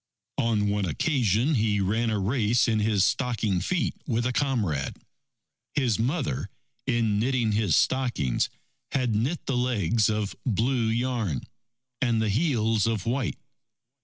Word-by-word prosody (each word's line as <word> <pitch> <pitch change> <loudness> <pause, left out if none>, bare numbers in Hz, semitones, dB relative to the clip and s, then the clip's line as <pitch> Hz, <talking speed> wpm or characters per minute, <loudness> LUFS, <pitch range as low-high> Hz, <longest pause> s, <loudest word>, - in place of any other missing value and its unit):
On 110 -3 +1
one 100 -1 0
occasion, 120 - +1
he 105 -5 +2
ran 110 +4 +1
a 110 - 0
race 110 +3 +2
in 110 -2 +2
his 105 -2 +3
stocking 110 -3 0
feet 175 - 0
with 120 -3 0
a 125 - 0
comrade. 110 - -1 0.8
His 120 -7 +1
mother, 130 - -1 0.4
in 110 -3 +1
knitting 120 -1 +1
his 105 -6 +2
stockings, 120 - +1 0.4
had 125 -4 +1
knit 125 +11 -1
the 135 - -1
legs 115 -4 +1
of 105 -2 -2
blue 120 +1 +1
yarn 115 - -1 0.6
and 120 -3 +2
the 110 -1 +1
heels 115 - +1
of 110 -4 -1
white. 120 -2 -1
115 Hz, 135 wpm, -26 LUFS, 105-125 Hz, 0.8 s, his